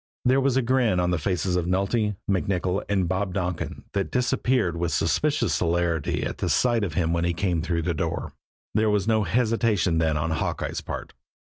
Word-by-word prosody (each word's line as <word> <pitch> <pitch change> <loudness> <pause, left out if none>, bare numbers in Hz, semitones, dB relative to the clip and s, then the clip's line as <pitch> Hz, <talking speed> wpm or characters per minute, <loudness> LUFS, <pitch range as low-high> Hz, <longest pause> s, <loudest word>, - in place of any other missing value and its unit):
There 130 +2 +4
was 135 -1 +2
a 135 - +2
grin 120 -6 +2
on 90 0 +1
the 90 - 0
faces 90 +2 -1
of 90 -1 0
Nulty, 100 +3 +1
MacNicoll 95 -1 0
and 95 -3 +1
Bob 95 +1 -2
Donkin 90 -3 -3
that 100 -1 -1
disappeared 125 -6 +1
with 85 0 -1
suspicious - - +1
celerity 85 -2 0
at - - -5
sight 120 -3 +2
of 85 -6 -3
him 85 -2 +1
as 85 - 0
he 85 0 0
came 85 -2 0
through 85 0 -1
the 85 +1 0
door. 75 - -3 0.4
There 110 +1 +2
was 105 -1 +1
no 110 -2 +2
hesitation 110 -4 +1
then 80 -2 +1
on 80 +2 -1
Hawkeye's 80 - -2
part. - - -6
95 Hz, 185 wpm, -25 LUFS, 85-110 Hz, 0.4 s, There